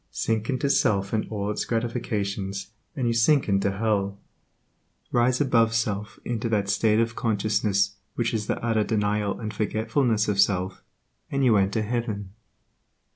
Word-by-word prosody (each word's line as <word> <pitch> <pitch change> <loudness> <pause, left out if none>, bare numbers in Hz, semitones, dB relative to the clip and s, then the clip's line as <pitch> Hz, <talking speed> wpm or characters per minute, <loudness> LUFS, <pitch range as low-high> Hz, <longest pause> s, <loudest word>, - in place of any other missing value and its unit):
Sink 110 -1 -1
into 135 +1 0
self 100 -7 +2
and 110 - 0
all 105 -1 -2
its - - -2
gratifications, 100 -4 -2 0.2
and 130 - -1
you 120 - +2
sink 130 +5 +3
into 100 -1 +2
hell; 100 -2 0 0.9
rise 125 +1 +2
above 115 -5 +3
self 105 -2 -2
into 115 -1 -2
that 100 -3 0
state 105 +1 +3
of 115 0 0
consciousness 105 -2 +1 0.2
which 120 -1 0
is 110 -1 -2
the - - 0
utter 110 -2 +2
denial 105 -1 0
and 110 -1 -5
forgetfulness 110 +2 0
of 100 -2 0
self, 95 -2 +1 0.5
and 140 -1 +1
you 115 -4 +5
enter 100 +2 +2
heaven. 105 -4 -3
110 Hz, 150 wpm, -25 LUFS, 100-115 Hz, 0.9 s, you